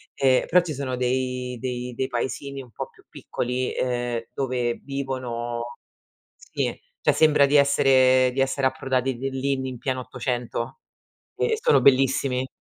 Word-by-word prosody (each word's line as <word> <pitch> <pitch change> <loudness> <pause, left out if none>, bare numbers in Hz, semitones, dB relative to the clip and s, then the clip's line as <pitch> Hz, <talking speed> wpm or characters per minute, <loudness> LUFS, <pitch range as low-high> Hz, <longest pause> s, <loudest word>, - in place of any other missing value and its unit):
Ehm, 130 -1 +3
però 180 - +6
ci 170 -3 -5
sono 130 -2 -3
dei 125 0 -1
dei 125 0 -4
dei 130 - -1
paesini 135 +3 -3
un 125 -3 -14
po' - - -6
più - - -24
piccoli 125 +1 -3
ehm, 120 -2 -1
dove 125 -3 -1
vivono 120 -3 -4 0.6
sì, - - -3 0.2
cioè - - +3
sembra 150 -2 +5
di 140 +1 +1
essere 130 -2 +5
di 135 - 0
essere 135 0 +2
approdati 130 -1 -1
de 135 +2 -3
lì 135 +1 -1
in 130 -1 -4
pieno 130 +1 -2
'800. 125 - -4 0.6
E 445 -2 +1
sono 480 0 +4
bellissimi. 130 -1 +3
130 Hz, 150 wpm, -24 LUFS, 125-135 Hz, 0.6 s, però